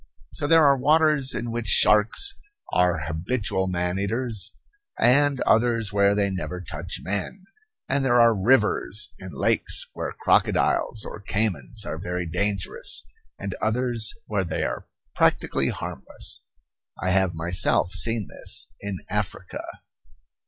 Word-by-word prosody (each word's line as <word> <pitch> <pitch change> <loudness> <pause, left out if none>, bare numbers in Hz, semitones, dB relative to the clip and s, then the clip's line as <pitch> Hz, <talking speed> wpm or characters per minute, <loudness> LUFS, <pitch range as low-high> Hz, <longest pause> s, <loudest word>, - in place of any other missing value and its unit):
So 145 - -2
there 165 0 +6
are 140 -1 +4
waters 150 -1 +4
in 120 0 -3
which 115 -1 -4
sharks 105 - +4 0.4
are 90 -3 +2
habitual 95 +4 -1
man 90 0 -1
eaters, 110 +1 -2 0.5
and 140 +2 +4
others 115 -2 +2
where 100 0 +3
they 100 -1 +1
never 90 -1 -4
touch 90 - -4
men; 105 - -3 0.4
and 135 0 0
there 120 -2 +3
are 115 -1 +6
rivers 105 -1 +2
and 95 -1 -9
lakes - - +1
where - - -4
crocodiles 110 - +2
or - - -8
caymans 100 - -1
are 80 - -5
very 90 +1 -3
dangerous, 90 -5 -1 0.3
and 100 -1 -5
others 115 0 0
where 100 -3 -1
they 85 - -3
are - - -4 0.3
practically - - +2
harmless - - -4 0.6
I 95 - -1
have 95 -2 +2
myself 90 +2 +1
seen 110 +2 0
this - - -1
in 100 -2 -5
Africa. 100 -2 -4
105 Hz, 130 wpm, -24 LUFS, 95-120 Hz, 0.6 s, there